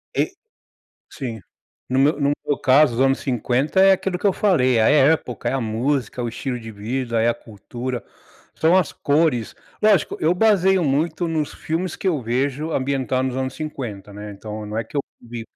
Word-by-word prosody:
E - - +1 0.8
Sim. 115 -5 -6 0.5
No 130 - 0
meu 145 +3 +4
no 140 0 +3 0.2
meu 145 - +1
caso, 140 0 +5
os 125 - 0
anos 135 +1 +3
50 130 - 0
é 195 0 +7
aquilo 190 -1 -2
que 205 - +2
eu 195 - +3
falei, 130 - +3
é 110 - +4
a - - +5
época, 145 -3 +2
é - - -2
a 135 - 0
música, 120 +2 -1
o 120 - -2
estilo 125 +2 -4
de 115 -1 -9
vida, 115 +3 -2
é 115 - +3
a - - +2
cultura, 120 +3 -6 0.5
são 165 +3 +4
as 180 -5 +1
cores. 145 -6 +1 0.3
Lógico, 210 -6 +3
eu 160 +3 +3
baseio 190 -3 +3
muito 155 +4 0
nos 155 -3 -1
filmes 165 +2 -3
que - - -3
eu 160 -7 +1
vejo 135 +6 -1
ambientados 130 -2 0
nos 130 - -4
anos 130 0 -3
50, 120 -10 -6
né, 105 +1 -8
então 105 +1 -7
não 105 +1 -4
é 115 - 0
que - - -16
eu - - +2 0.2
vi 120 -1 -8
135 Hz, 195 wpm, -22 LUFS, 120-155 Hz, 0.8 s, é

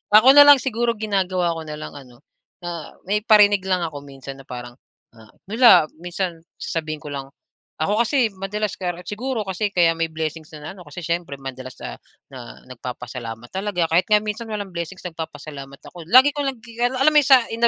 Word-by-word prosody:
ako 230 +5 +9
na 290 +1 +9
lang 290 - +11
siguro 240 -3 -1
ginagawa 190 -5 0
ko 165 -1 -6
na 150 - -5
lang 150 - -8
ano, 125 -4 -14 0.4
na 170 -2 -6
may 205 +3 0
parinig 210 -2 +5
lang 185 -2 +1
ako 150 -3 -4
minsan 135 0 -10
na 135 - -15
parang, 120 0 -8 0.3
ah, 110 -2 -17 0.2
wala, 225 -7 +7 0.2
minsan 175 -1 -4 0.2
sasabihin 155 -2 -4
ko 145 - -7
lang, 135 -1 -5 0.5
ako 205 +8 0
kasi 250 -4 +2
madalas 205 +1 -3
ka 180 -2 -2
siguro 230 +3 -3
kasi 195 +2 -2
kaya 170 -2 +5
may 165 - +1
blessings 160 0 -5
na 150 +2 -8
ano 185 -3 -13
kasi 175 - -8
siyempre 170 -3 -2
madalas, 130 -1 -8
ah, - - -7 0.3
na - - -10 0.2
nagpapasalamat 120 -2 -7
talaga, 190 -2 -1
kahit 175 +2 +3
nga 210 0 +4
minsan 220 +2 -4
walang 205 -3 -5
blessings 170 +2 -6
nagpapasalamat 155 -5 -8
ako, 170 -3 -11
lagi 255 +9 +7
ko 290 - -7
lang 270 - -2
gi 235 -1 -13
a 245 - +4
alam 265 +4 +2
mo 300 - +6
sa 265 -3 +6
in 230 +1 +3
180 Hz, 195 wpm, -22 LUFS, 150-215 Hz, 0.5 s, lang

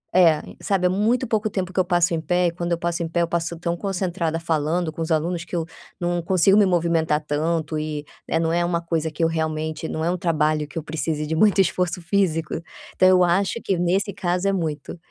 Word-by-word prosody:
É, 165 -4 +5 0.2
sabe, 190 -2 0
é - - +1
muito 220 +7 +1
pouco 215 -1 0
tempo 185 -2 -3
que - - 0
eu 185 - +5
passo 175 -1 +2
em 160 - -1
pé 180 +3 +1
e - - 0
quando 170 0 -4
eu 170 - +2
passo 170 0 -2
em - - -2
pé, 170 +1 0
eu - - 0
passo 170 0 -2
tão 170 0 -1
concentrada 175 -3 -2
falando 165 +1 0
com 165 - -6
os 160 - -2
alunos 165 +2 0
que 175 - -7
eu 165 -2 -1 0.3
não 175 0 -1
consigo 185 +2 +3
me 210 - +6
movimentar 165 -3 +1
tanto 155 +1 -1
e, 150 -1 -4 0.2
né, - - +1
não 165 0 0
é 175 0 +2
uma 175 -1 0
coisa 165 -1 -1
que 165 +2 -2
eu - - +5
realmente 160 -1 -2
não 160 0 -2
é 175 - +1
um 180 - -1
trabalho 155 -3 +1
que 150 - -10
eu 160 - -2
precise 155 0 -2
de 160 - -1
muito 205 +3 +4
esforço 180 -1 0
físico. 170 -3 0 0.4
Então 185 - +5
eu 180 -1 +5
acho 190 +5 +1
que 195 - +1
nesse 185 +3 0
caso 180 0 -1
é 195 - +2
muito. 160 -3 -3
170 Hz, 240 wpm, -23 LUFS, 160-180 Hz, 0.4 s, me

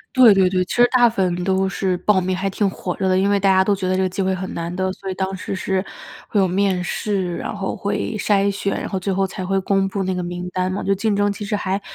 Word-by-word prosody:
对 245 -5 +8
对 190 -2 +4
对， 185 -1 +1
其 180 - -5
实 245 0 +6
大 245 -2 +6
部 225 - -11
分 180 -2 0
都 190 0 +1
是 190 -1 -1
报 190 +1 +2
名 185 +1 -1
还 195 +1 -1
挺 195 +1 0
火 180 -1 -5
热 190 - 0
的。 185 - +3
因 200 +1 +2
为 205 - +3
大 195 0 +3
家 190 0 +4
都 205 - +2
觉 190 -1 -4
得 185 0 +1
这 - - +1
个 185 - +2
机 185 +2 -3
会 190 0 +1
很 185 0 -4
难 170 +1 -4
得， 185 +1 -1
所 195 0 -8
以 - - -2
当 190 +1 -3
时 195 +1 -5
是 190 0 -1 0.5
会 210 - +1
有 190 - +3
面 190 0 +1
试， 185 -1 -2
然 - - -4
后 195 -2 -3
会 205 +2 -2
筛 200 0 +2
选， 200 0 -2
然 - - -4
后 190 - -3
最 195 +1 -2
后 195 0 +1
才 185 0 -6
会 195 +1 +1
公 195 0 +1
布 195 0 -2
那 185 0 -1
个 180 - -2
名 175 +1 -5
单 185 0 0
嘛。 195 - -3
就 195 - +1
竞 215 +2 0
争 205 0 +2
其 210 - -7
实 210 +1 -4
还 195 -1 -1
190 Hz, 320 characters per minute, -21 LUFS, 185-200 Hz, 0.5 s, 对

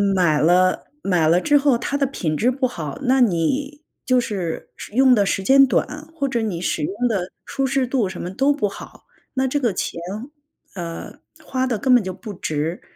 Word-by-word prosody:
买 160 -5 +3
了 180 +3 +3
买 175 -5 +2
了 175 +2 +4
之 290 +7 +3
后 275 -3 +3
它 280 +4 -3
的 280 - +2
品 170 - -2
质 245 +10 +2
不 260 0 0
好， 165 - -6
那 260 0 +3
你 265 - 0 0.2
就 255 -1 +3
是 190 -8 -3 0.2
用 255 +2 +5
的 205 - +3
时 195 - 0
间 275 +5 +6
短， 300 +3 -1
或 280 -4 -1
者 240 -3 -1
你 200 -6 -2
使 165 -3 -1
用 210 +10 -1
的 190 -5 -2
舒 270 - -2
适 265 -1 +1
度 240 -7 0
什 185 - -7
么 175 - -4
都 270 +7 +2
不 245 -8 0
好， 200 - -11 0.3
那 265 0 +1
这 275 +3 -1
个 235 -7 0
钱， 170 - -3 0.7
呃， 170 -3 -7 0.3
花 260 0 -1
的 245 -4 -1
根 260 -2 +4
本 240 - +4
就 190 - -4
不 210 +2 -8
值， 160 -1 -3
230 Hz, 220 characters per minute, -21 LUFS, 180-265 Hz, 0.7 s, 间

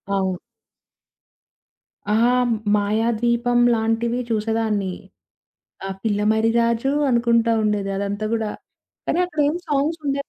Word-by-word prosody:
అవు. 190 -2 -1 1.7
ఆ! 210 - +1 0.6
'మాయాద్వీపం' 235 +3 +1
లాంటివి 225 +2 0
చూసేదాన్ని. 215 -3 -1 0.9
ఆహ్, 195 0 -5
పిల్ల 205 -2 0
మర్రిరాజు 230 +3 +1 0.2
అనుకుంటా 235 -1 +2
ఉండేది 210 -2 0
అదంతా 200 +2 -2
గూడా. 220 -2 -1 0.6
అరే, - - +1
అక్కడ 315 -4 -4
ఏం 305 - -1
సాంగ్స్ 300 +3 0
ఉండేవి 280 0 -2
225 Hz, 100 wpm, -22 LUFS, 210-240 Hz, 1.7 s, అనుకుంటా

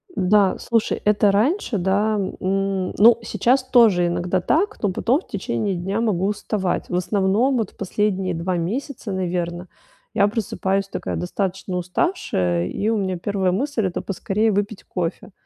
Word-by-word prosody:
Да. 195 +1 +3
Слушай, 230 -2 0
это 210 -1 +4
раньше, 245 - +1
да, 200 +4 +1
м, 195 -1 -1
ну, 230 +2 +7
сейчас 235 +5 +1
тоже 225 -9 +4
иногда 175 +1 -1
так, 375 - 0
но 205 - +1
потом 250 - +1
в - - -25
течение 190 - -2
дня 195 +5 -2
могу 195 -5 +1
уставать. 205 -2 -2
В - - -2
основном, 205 +7 +1
вот 220 -5 -2
в - - -31
последние 195 -1 -1
2 175 +2 -2
месяца, 220 +6 -4
наверно, 175 -1 -3 0.5
я 200 -2 +4
просыпаюсь 195 -2 -1
такая - - -4
достаточно 185 0 -3
уставшая, 170 - -1
и 210 - -2
у 225 - +1
меня 190 -3 -1
1 190 0 0
мысль- 230 +2 -1
это 180 - -2
поскорее 210 +3 0
выпить 205 +1 -2
кофе. 180 +2 -4
195 Hz, 155 wpm, -22 LUFS, 180-220 Hz, 0.5 s, ну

